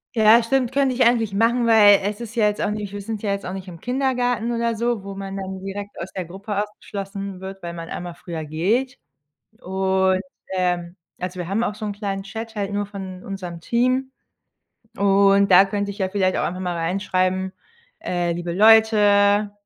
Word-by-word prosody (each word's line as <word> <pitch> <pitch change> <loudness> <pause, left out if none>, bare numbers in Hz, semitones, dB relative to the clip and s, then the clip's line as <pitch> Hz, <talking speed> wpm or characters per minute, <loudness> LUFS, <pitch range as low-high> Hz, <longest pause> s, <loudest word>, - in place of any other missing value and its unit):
Ja, 220 +1 +6
stimmt, 255 0 0
könnte 275 -2 +2
ich 245 - +3
eigentlich 230 -4 +2
machen, 230 +3 +2
weil 205 -3 +7
es 205 +2 -2
ist 230 -1 -8
ja 215 -2 +3
jetzt 210 - -4
auch - - 0
nicht 210 -2 -4
wir 205 0 -6
sind 220 +1 -5
ja 200 - 0
jetzt 200 0 -3
auch 185 - -4
nicht 190 -1 -7
im 170 -2 -11
Kindergarten 245 -2 0
oder 235 -1 0
so, 235 -3 -1
wo 195 0 -6
man 195 0 -6
dann 190 0 -6
direkt 200 +1 -6
aus 180 - -6
der 185 -2 -5
Gruppe 200 +4 -4
ausgeschlossen 200 -2 -6
wird, 190 0 -9
weil 170 - -4
man 165 -1 -7
einmal 175 -1 -6
früher 170 -3 -6
geht. 205 - -1 0.6
Und, 190 0 +1 0.3
ähm 175 -1 -1 0.3
also 180 0 -4
wir 175 0 -4
haben 220 +5 0
auch 210 - -2
so 215 0 -7
'n 205 - -2
kleinen 200 -1 -4
Chat 225 +3 -7
halt 205 -1 -3
nur 205 0 -1
von 190 -2 -8
unserem 180 -4 -6
Team. 255 +5 +1 0.9
Und 200 0 +4
da 185 +2 +9
könnte 200 0 -2
ich 200 - -12
ja 190 -1 0
vielleicht 190 -2 +1
auch - - 0
einfach 185 +2 -3
mal 180 -2 -2
reinschreiben, 185 +2 -1 0.5
äh: 175 -1 -1
„Liebe 175 0 -4
Leute, 205 0 +5
200 Hz, 200 wpm, -22 LUFS, 185-220 Hz, 0.9 s, da